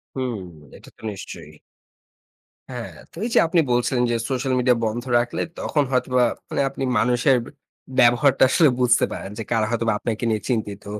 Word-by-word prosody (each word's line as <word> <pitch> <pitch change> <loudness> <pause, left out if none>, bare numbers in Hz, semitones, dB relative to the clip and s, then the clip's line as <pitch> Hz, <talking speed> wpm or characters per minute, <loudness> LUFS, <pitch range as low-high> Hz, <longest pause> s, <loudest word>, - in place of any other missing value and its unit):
হুম, 125 -6 -3 0.4
এটা - - -16
তো - - -24
নিশ্চয়ই। 85 -5 -9 1.2
হ্যাঁ, - - -6 0.2
তো - - -19
এই 240 - -2
যে, - - +6
আপনি 165 +1 +2
বলছিলেন 125 +1 +1
যে, 120 - +1
সোশ্যাল 130 0 -1
মিডিয়া 125 -1 +3
বন্ধ 115 +2 -3 0.2
রাখলে, 120 0 -2 0.2
তখন 145 - 0
হয়তোবা 125 -1 +2 0.5
আপনি 135 0 -5
মানুষের 125 +4 +3 0.6
ব্যবহারটা 120 +3 +5
আসলে 160 0 +5
বুঝতে 120 -1 +4
পারেন। 95 - -6
যে, - - -3
কারা 110 -2 +2
হয়তোবা 115 -1 0
আপনাকে 115 +1 -3
নিয়ে 110 -1 -1
চিন্তিত। 105 -4 -2
120 Hz, 160 wpm, -22 LUFS, 115-130 Hz, 1.2 s, যে